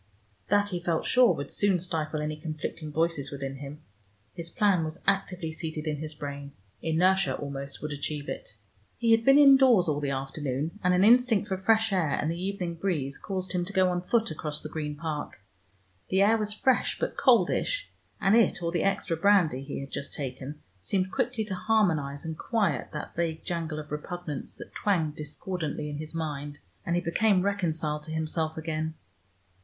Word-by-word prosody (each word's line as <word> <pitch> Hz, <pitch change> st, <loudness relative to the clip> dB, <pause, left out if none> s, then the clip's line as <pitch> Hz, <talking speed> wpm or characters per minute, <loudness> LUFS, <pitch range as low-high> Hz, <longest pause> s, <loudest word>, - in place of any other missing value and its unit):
That, 205 Hz, 0 st, +3 dB
he 180 Hz, -3 st, -2 dB
felt 170 Hz, -2 st, -1 dB
sure, 250 Hz, -2 st, +5 dB
would 140 Hz, -, -6 dB
soon 200 Hz, -3 st, +2 dB
stifle 160 Hz, -3 st, -1 dB
any 155 Hz, 0 st, -2 dB
conflicting 155 Hz, 0 st, -5 dB
voices 160 Hz, -3 st, 0 dB
within 135 Hz, -1 st, -5 dB
him. 145 Hz, +2 st, -9 dB, 0.5 s
His 170 Hz, -1 st, -6 dB
plan 200 Hz, -4 st, +2 dB
was 155 Hz, +1 st, -5 dB
actively 185 Hz, -4 st, 0 dB
seated 160 Hz, -1 st, -5 dB
in 150 Hz, -1 st, -1 dB
his 155 Hz, +1 st, -6 dB
brain; 140 Hz, -1 st, -6 dB, 0.3 s
inertia, 185 Hz, +4 st, +2 dB
almost, 140 Hz, 0 st, -6 dB
would 150 Hz, -, -3 dB
achieve 145 Hz, 0 st, -4 dB
it. 105 Hz, -, -6 dB, 0.4 s
He 230 Hz, -1 st, +2 dB
had 225 Hz, 0 st, +5 dB
been 270 Hz, +3 st, +7 dB
indoors 265 Hz, -9 st, +7 dB
all 150 Hz, -2 st, +1 dB
the 145 Hz, -1 st, -1 dB
afternoon, 135 Hz, +5 st, -3 dB
and 180 Hz, 0 st, +4 dB
an 180 Hz, -, +4 dB
instinct 230 Hz, -2 st, +5 dB
for 190 Hz, -, +1 dB
fresh 220 Hz, +1 st, +3 dB
air 165 Hz, -7 st, +1 dB
and 155 Hz, -, 0 dB
the 170 Hz, +1 st, -4 dB
evening 185 Hz, -3 st, -3 dB
breeze 155 Hz, -7 st, -2 dB
caused 185 Hz, -2 st, -4 dB
him 180 Hz, -1 st, +1 dB
to 195 Hz, +3 st, -6 dB
go 185 Hz, -1 st, +4 dB
on 175 Hz, 0 st, -1 dB
foot 225 Hz, +2 st, +1 dB
across 150 Hz, -1 st, -3 dB
the 155 Hz, -, -7 dB
Green 150 Hz, -1 st, -4 dB
Park. 155 Hz, -, -5 dB, 0.7 s
The 190 Hz, +1 st, +4 dB
air 215 Hz, +3 st, +5 dB
was 215 Hz, -1 st, 0 dB
fresh 250 Hz, +4 st, +2 dB
but -, -, -2 dB
coldish, -, -, +2 dB, 0.3 s
and 195 Hz, +2 st, +4 dB
it 220 Hz, -6 st, +3 dB
or 170 Hz, -, 0 dB
the 170 Hz, -2 st, 0 dB
extra 195 Hz, -3 st, 0 dB
brandy 170 Hz, -6 st, +3 dB
he 140 Hz, 0 st, -5 dB
had 135 Hz, -, -8 dB
just 140 Hz, -, -5 dB
taken 135 Hz, +1 st, -6 dB, 0.2 s
seemed 185 Hz, -, 0 dB
quickly 245 Hz, -3 st, -1 dB
to 205 Hz, -, -4 dB
harmonize 165 Hz, -9 st, +1 dB
and 160 Hz, 0 st, -3 dB
quiet 200 Hz, -, 0 dB
that 150 Hz, -, -6 dB
vague 165 Hz, -1 st, -2 dB
jangle 165 Hz, -3 st, -3 dB
of 150 Hz, -1 st, -7 dB
repugnance 150 Hz, -1 st, -5 dB
that -, -, -11 dB
twanged 165 Hz, -7 st, 0 dB
discordantly 150 Hz, 0 st, -4 dB
in 145 Hz, -, -5 dB
his 155 Hz, +1 st, -6 dB
mind, 145 Hz, -2 st, -4 dB, 0.3 s
and 170 Hz, -, +1 dB
he 175 Hz, -, +1 dB
became 185 Hz, +2 st, +3 dB
reconciled 165 Hz, -6 st, -1 dB
to 160 Hz, -, -7 dB
himself 160 Hz, 0 st, -1 dB
again. 160 Hz, 0 st, -3 dB
165 Hz, 185 wpm, -28 LUFS, 150-195 Hz, 0.7 s, been